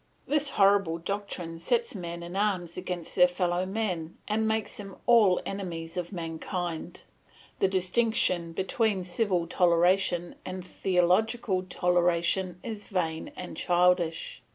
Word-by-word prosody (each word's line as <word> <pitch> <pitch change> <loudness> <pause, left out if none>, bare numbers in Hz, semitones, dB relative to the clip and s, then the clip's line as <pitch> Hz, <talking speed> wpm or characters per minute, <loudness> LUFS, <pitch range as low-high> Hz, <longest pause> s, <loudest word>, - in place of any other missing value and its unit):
This 295 -1 +1
horrible 195 -7 +3
doctrine 175 -2 -5
sets 235 +7 +1
men 170 -3 -6
in 175 +2 -7
arms 190 -4 0
against 180 -2 -4
their 180 -1 +7
fellow 180 0 -1
men, 185 -6 -3
and 220 +1 +1
makes 220 0 -1
them 195 -2 -8
all 220 -6 +5
enemies 170 -4 -5
of 175 -1 -3
mankind. 170 0 -4 0.6
The - - +4
distinction 185 -2 +1
between 195 +2 0
civil 180 -1 0
toleration 175 0 +2
and 185 0 -6
theological 185 +3 +1
toleration 180 +1 +1
is 220 -3 -6
vain 165 -4 -2
and 180 - -7
childish. 175 -2 +1
180 Hz, 125 wpm, -28 LUFS, 175-200 Hz, 0.6 s, their